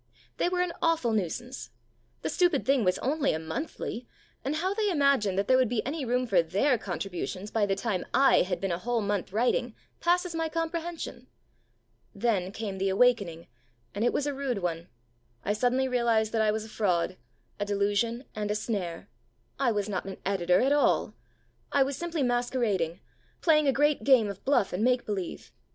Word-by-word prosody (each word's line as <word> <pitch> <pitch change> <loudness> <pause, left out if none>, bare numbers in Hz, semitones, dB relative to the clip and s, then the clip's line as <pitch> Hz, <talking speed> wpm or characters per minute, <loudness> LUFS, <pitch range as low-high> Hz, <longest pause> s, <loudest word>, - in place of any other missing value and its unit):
They - - +1
were 360 0 0
an 360 -1 -1
awful 330 -8 +2
nuisance. 220 - -3 0.5
The 160 - -1
stupid 350 - +2
thing 270 -3 +3
was 185 -1 +2
only 285 +2 +1
a - - -1
monthly, 240 - -5 0.4
and 275 +3 -1
how 370 +5 0
they 420 0 0
imagined 275 - +2
that 200 - +1
there 255 - +5
would 255 -3 +3
be 230 -3 -1
any 285 +1 -3
room 250 +1 +1
for 195 -7 +4
their 210 - +1
contributions, 195 +1 -4
by 215 -2 +1
the 195 - +1
time 195 -3 -2
I 270 +2 +5
had 180 0 -1
been 195 -2 -2
a 170 - -1
whole 240 +2 -1
month 205 -3 -2
writing, 235 +2 +1 0.2
passes 355 0 +1
my 325 -1 -1
comprehension. 330 -5 -4 0.9
Then 200 -4 0
came 200 -2 -5
the 195 0 +1
awakening, 195 -6 +2 0.5
and 205 - -2
it 240 - +3
was 290 - -1
a 290 - -1
rude 270 -4 -2
one. 170 -1 -2 0.6
I 205 - +1
suddenly 250 +4 +1
realized 235 -3 +2
that 225 - +1
I 215 - +3
was 215 0 -1
a - - -11
fraud, 180 -6 0 0.4
a 205 - 0
delusion, 205 +4 0
and 210 -1 -2
a 210 - 0
snare. 200 -6 -3 0.5
I 260 -3 +3
was 205 -2 -1
not 190 -3 -3
an 195 - -6
editor 180 -2 +2
at 270 - +2
all. 290 -6 +2 0.6
I 280 - +4
was 275 +1 -3
simply 340 -2 -2
masquerading, 240 -9 0 0.4
playing 305 -3 +4
a - - +5
great 295 +2 +2
game 255 -6 +5
of 200 -1 -8
bluff 265 -9 +2
and 185 +4 -1
make 250 0 +2
believe. 195 -4 -5
235 Hz, 190 wpm, -28 LUFS, 200-275 Hz, 0.9 s, there